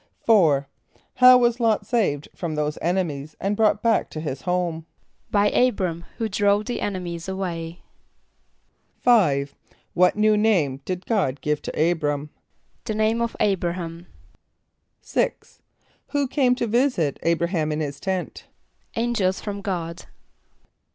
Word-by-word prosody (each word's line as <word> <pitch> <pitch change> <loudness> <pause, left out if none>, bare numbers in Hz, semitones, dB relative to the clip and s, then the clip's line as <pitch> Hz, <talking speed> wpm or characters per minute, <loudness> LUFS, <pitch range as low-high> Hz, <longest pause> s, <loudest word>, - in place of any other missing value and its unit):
= - - -38
=4.= 160 -11 +4 0.5
How 255 0 +9
was 240 -1 +2
L[)o]t 225 -2 +2
saved 175 - 0
from 165 -3 -4
those 150 0 -2
enemies 155 -4 -2
and 200 +2 -1
brought 210 -1 +2
back 230 -1 +2
to 155 - -6
his 145 -4 -4
home? 175 -3 -2 0.4
=By 205 0 +3
[=A]´br[)a]m, 185 -9 +1
who 225 - -1
drove 205 0 +2
the 245 -2 -3
enemies 180 -3 -4
away.= 175 -3 -5 1.2
=5.= 145 - +3 0.4
What 180 +1 +4
new 215 0 +3
name 175 -11 +1
did 185 0 -4
God 185 - 0
give 150 -1 -1
to - - -5
[=A]´br[)a]m? 150 -3 0 0.5
=The 215 - -2
name 220 +2 +1
of 235 -1 -2
[=A]´br[)a] 180 -4 +1
h[)a]m.= 170 -1 -7 1.0
=6.= - - -2 0.5
Who 285 -1 0
came 250 -2 +2
to 245 - -1
visit 235 - +1
[=A]´br[)a] 170 0 +1
h[)a]m 155 -4 0
in 150 - -2
his 140 -2 -4
tent? 190 -2 -4 0.5
=Angels 225 -5 0
from 200 -1 -5
God. 175 -4 -4
185 Hz, 140 wpm, -23 LUFS, 160-215 Hz, 1.2 s, How